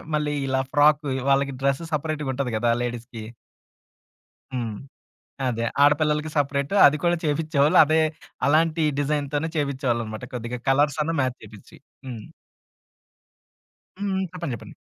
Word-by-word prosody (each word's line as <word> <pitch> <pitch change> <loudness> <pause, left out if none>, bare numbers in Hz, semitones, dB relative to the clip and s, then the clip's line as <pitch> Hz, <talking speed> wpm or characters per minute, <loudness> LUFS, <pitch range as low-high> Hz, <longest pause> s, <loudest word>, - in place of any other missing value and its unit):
మళ్ళీ 150 -1 -1
ఇలా 130 0 +1
ఫ్రాకు 150 0 +4 0.2
వాళ్ళకి 140 0 +2
డ్రెస్ 140 +4 +1
సెపరేట్‌గ 150 -2 -2
ఉంటంది 125 -3 -3
కదా! 120 +1 +2
లేడీస్‌కి. 120 -2 -6 1.3
హ్మ్. 115 -4 -3 0.7
అదే, 115 -2 -1 0.2
ఆడపిల్లలకి 150 +1 +3
సెపరేటు 140 +4 0
అది 150 +2 +4
కూడా 175 0 +3
చేపించేవాళ్ళు. 150 -1 +2
అదే 155 +2 +2 0.5
అలాంటి 160 +2 +2 0.2
డిజైన్‌తోనే 145 +1 -1
చేపించేవాళ్ళనమాట. 125 -6 -2
కొద్దిగా 120 +1 -4
కలర్సన్న 150 +3 +1
మ్యాచ్ 130 -1 -1
చేపిచ్చి. 105 -1 -14 0.3
హ్మ్. 115 -4 -7 1.7
హ్మ్. 195 -1 -1
చెప్పండి 170 -8 -4
చెప్పండి. - - -13
140 Hz, 115 wpm, -24 LUFS, 125-150 Hz, 1.7 s, ఫ్రాకు